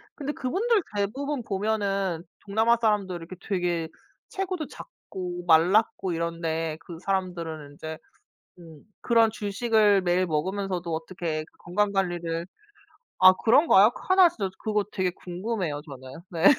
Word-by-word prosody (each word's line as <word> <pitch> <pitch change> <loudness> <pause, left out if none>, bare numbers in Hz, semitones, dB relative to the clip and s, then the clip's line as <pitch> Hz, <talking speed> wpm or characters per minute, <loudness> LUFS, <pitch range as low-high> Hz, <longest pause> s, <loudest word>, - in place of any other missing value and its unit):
근데 290 -1 -3
그분들 400 - +1
대부분 255 +7 -2
보면은 195 -4 -1 0.2
동남아 225 +4 +3
사람들 205 -5 +1
이렇게 170 +2 -9
되게 175 -4 -1 0.4
체구도 370 -5 -3
작고 180 - -8
말랐고 180 +3 +4
이런데 165 -1 -2
그 165 0 -9
사람들은 170 -6 -3
인제 160 +2 -7 0.6
음 165 -4 -13 0.2
그런 230 -2 +4
주식을 210 -1 +2
매일 180 +1 +2
먹으면서도 180 +2 -2
어떻게 160 -1 -3
건강 200 +4 0
관리를 175 -3 -1 0.7
아 185 0 +10
그런가요? 225 - +5 0.2
하나 375 -1 +7
진짜 200 - -3
그거 210 -1 0
되게 185 -2 0
궁금해요 180 -3 -4
저는. 130 +1 -10
네. 165 -2 -3
185 Hz, 295 characters per minute, -26 LUFS, 170-215 Hz, 0.7 s, 아